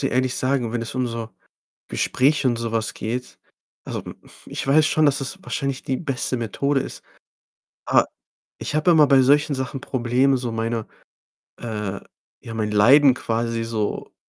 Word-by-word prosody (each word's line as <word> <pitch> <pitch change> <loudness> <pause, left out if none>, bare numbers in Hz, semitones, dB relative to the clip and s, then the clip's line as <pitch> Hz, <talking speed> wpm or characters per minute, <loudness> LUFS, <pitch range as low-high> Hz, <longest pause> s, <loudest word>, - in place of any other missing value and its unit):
dir 135 - 0
ehrlich 130 0 +1
sagen, 130 -3 0
wenn 120 -1 -1
es 115 - -6
um 130 -1 0
so 115 -1 -5 0.6
Gespräche 140 +1 +1
und 120 -2 +1
so 115 -1 -3
was 110 -1 -1
geht, 125 +3 -5 0.5
also, - - -5
hm, - - -9
pf - - -18
ich - - -4
weiß 150 +3 +4
schon, 155 0 +3
dass 145 -2 +3
das 145 +8 -5
wahrscheinlich 135 -6 -3
die 130 - -1
beste 130 -4 -2
Methode 135 +5 0
ist, - - -8 0.8
aber - - +4 0.5
ich - - -4
habe 155 +3 +3
immer 155 -3 +6
bei 135 -1 +6
solchen 145 +3 +3
Sachen 130 +1 -4
Probleme, 130 +2 +1
so 125 -2 -4
meine 115 0 -2 0.7
äh, 105 -4 -4 0.4
ja, 115 - -8
mein 110 -1 -2
Leiden 130 +6 +6
quasi 115 -1 -2
so 110 -2 -3
125 Hz, 170 wpm, -22 LUFS, 115-140 Hz, 0.8 s, immer